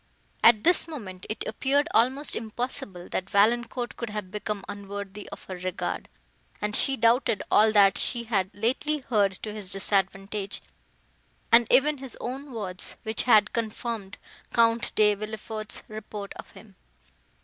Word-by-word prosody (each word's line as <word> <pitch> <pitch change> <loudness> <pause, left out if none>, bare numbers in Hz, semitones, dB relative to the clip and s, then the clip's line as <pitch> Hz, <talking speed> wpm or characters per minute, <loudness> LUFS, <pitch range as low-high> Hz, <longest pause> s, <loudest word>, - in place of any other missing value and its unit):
At 220 -2 +7
this 350 -1 +4
moment, 200 - -8
it 215 - -3
appeared 285 +3 +1
almost 260 +5 +2
impossible, 220 -5 -3
that 190 +1 -3
Valancourt 240 +4 +2
could 235 - -4
have 210 -3 -5
become 210 -1 -4
unworthy 200 0 -7
of - - -10
her 185 - -7
regard, 185 +1 -4 0.5
and 210 0 -1
she 270 -1 +2
doubted 230 -2 +2
all 215 +1 +6
that 200 -2 +5
she 240 -1 +1
had 200 -5 0
lately 260 +8 -1
heard 205 -5 +3
to 215 - -4
his 210 -3 -7
disadvantage, 195 0 -1 0.9
and 230 -1 +6
even 285 +3 +4
his 265 -3 -6
own 270 +3 -5
words, 195 -6 -1
which 220 -1 0
had 210 -3 +6
confirmed 225 -2 -4 0.3
Count 230 0 +3
De 210 -1 +5
Villefort's 215 +1 -5
report 215 -2 -7
of - - -10
him. 200 -4 -16
215 Hz, 145 wpm, -27 LUFS, 200-240 Hz, 0.9 s, At